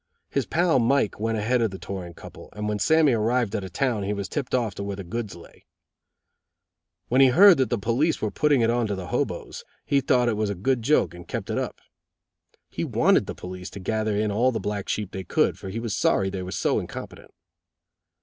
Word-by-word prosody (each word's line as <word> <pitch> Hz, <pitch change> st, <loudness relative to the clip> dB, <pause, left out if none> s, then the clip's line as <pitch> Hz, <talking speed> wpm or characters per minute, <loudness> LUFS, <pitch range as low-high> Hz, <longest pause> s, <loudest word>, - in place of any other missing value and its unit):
His 140 Hz, -3 st, -1 dB
pal 170 Hz, -4 st, +2 dB
Mike 120 Hz, -3 st, +1 dB
went 115 Hz, +1 st, -1 dB
ahead 120 Hz, +4 st, +1 dB
of 115 Hz, -, +2 dB
the 95 Hz, -, -8 dB
touring 90 Hz, -3 st, -7 dB
couple, -, -, -12 dB
and 105 Hz, 0 st, -4 dB
when 105 Hz, 0 st, -1 dB
Sammy 155 Hz, +3 st, +4 dB
arrived 115 Hz, 0 st, +1 dB
at 100 Hz, -, -2 dB
a 95 Hz, -, -6 dB
town 120 Hz, +2 st, -1 dB
he 100 Hz, +1 st, -2 dB
was 100 Hz, -1 st, -4 dB
tipped 140 Hz, -4 st, -2 dB
off 115 Hz, -5 st, 0 dB
to 100 Hz, -, -6 dB
where 100 Hz, 0 st, -4 dB
the 100 Hz, -, -7 dB
goods 110 Hz, +3 st, -5 dB
lay. 85 Hz, -, -16 dB, 1.4 s
When 130 Hz, +3 st, +4 dB
he 135 Hz, -, +8 dB
heard 180 Hz, +8 st, +7 dB
that 130 Hz, -4 st, +2 dB
the 120 Hz, -, 0 dB
police 120 Hz, +10 st, 0 dB
were 110 Hz, -, -2 dB
putting 145 Hz, -4 st, +2 dB
it 115 Hz, 0 st, +3 dB
on 120 Hz, -1 st, +1 dB
to 100 Hz, -, -2 dB
the 90 Hz, -2 st, -7 dB
hoboes, -, -, -3 dB, 0.2 s
he 140 Hz, -1 st, +2 dB
thought 125 Hz, -2 st, +2 dB
it 115 Hz, -, +1 dB
was 105 Hz, -1 st, 0 dB
a 100 Hz, -, -2 dB
good 120 Hz, +7 st, 0 dB
joke 130 Hz, -, +2 dB
and 90 Hz, -1 st, -11 dB
kept -, -, -4 dB
it -, -, 0 dB
up. -, -, -5 dB, 0.9 s
He -, -, -3 dB
wanted -, -, +2 dB
the -, -, -5 dB
police 90 Hz, +1 st, -8 dB
to 100 Hz, -, -9 dB
gather 110 Hz, +2 st, -1 dB
in 105 Hz, 0 st, 0 dB
all 120 Hz, +5 st, +2 dB
the 115 Hz, -, -2 dB
black 100 Hz, 0 st, -4 dB
sheep 105 Hz, -2 st, -2 dB
they 95 Hz, -, -5 dB
could, -, -, +1 dB
for 95 Hz, -, -7 dB
he 110 Hz, +4 st, -4 dB
was 115 Hz, -3 st, -3 dB
sorry 95 Hz, -1 st, +1 dB
they 95 Hz, -, -4 dB
were 90 Hz, 0 st, -6 dB
so 90 Hz, -, +1 dB
incompetent. -, -, -8 dB
110 Hz, 230 wpm, -25 LUFS, 100-125 Hz, 1.4 s, he